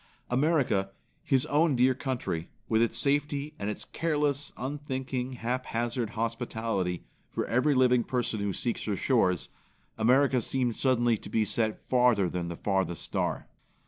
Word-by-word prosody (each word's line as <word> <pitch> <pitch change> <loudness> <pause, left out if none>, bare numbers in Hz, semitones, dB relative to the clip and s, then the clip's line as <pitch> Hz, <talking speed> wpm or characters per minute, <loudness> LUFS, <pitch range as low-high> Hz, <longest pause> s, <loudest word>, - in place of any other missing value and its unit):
America, 125 -8 +2 0.3
his 130 -2 +2
own 150 0 +3
dear 125 +1 +4
country, 125 - -3 0.2
with 110 0 +2
its 115 - +1
safety 145 +1 0
and 100 0 -2
its 105 - -4
careless, 145 -3 -1
unthinking 130 -2 -3
haphazard 120 -1 -2
hospitality 115 -5 -2 0.3
for - - -2
every 130 +5 +2
living 125 -2 +4
person 120 -3 -1
who 100 0 -1
seeks 120 +5 -2
her 105 - 0
shores; 95 -8 +1 0.5
America 130 +3 +4
seemed 125 -1 0
suddenly 120 -3 +2
to - - -9
be 110 -1 +1
set 110 0 -2
farther 125 -6 +4
than 90 0 -3
the 85 - -4
farthest 95 -2 -1
star. - - -2
125 Hz, 145 wpm, -29 LUFS, 110-135 Hz, 0.5 s, dear